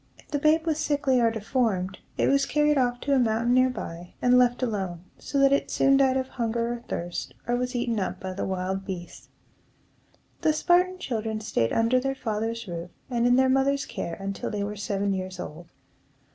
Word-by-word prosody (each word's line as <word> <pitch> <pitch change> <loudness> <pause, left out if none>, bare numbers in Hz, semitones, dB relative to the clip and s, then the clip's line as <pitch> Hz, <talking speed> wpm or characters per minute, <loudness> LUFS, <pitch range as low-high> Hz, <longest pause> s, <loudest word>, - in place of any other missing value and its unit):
If - - -21
the 290 - -1
babe 315 +2 +3
was 315 -2 0
sickly 285 -4 +2
or 230 - +4
deformed, 215 -4 -1 0.2
it - - +2
was 275 0 +3
carried 300 0 +3
off 245 -2 +1
to 280 - 0
a 270 - +4
mountain 235 0 +2
near 255 0 +5
by, 175 -8 -7
and 250 0 +4
left 250 0 +3
alone; 190 -7 -2 0.2
so 280 - -4
that 275 0 +5
it 280 - +1
soon 275 0 +4
died 265 -1 +3
of 260 0 -1
hunger 235 -1 -1
or 240 0 -7
thirst, 175 0 -4
or 240 - +1
was 250 0 -2
eaten 240 -2 0
up 185 -1 -3
by 185 0 -5
the 190 - -4
wild 190 +1 -2
beasts. 185 -3 -8 1.1
The 310 - +3
Spartan 360 +3 +3
children 220 -8 -3
staid 115 - 0
under 230 +3 +3
their 270 +1 -2
father's 225 -2 -3
roof 170 0 -5 0.2
and 240 0 +2
in 245 - +5
their 260 +1 +4
mother's 270 +2 +2
care 170 - -5
until 195 0 -4
they 205 -2 -2
were 205 +1 -4
seven 200 -1 -1
years 185 -1 -4
old. 165 +2 -7
235 Hz, 200 wpm, -26 LUFS, 195-265 Hz, 1.1 s, near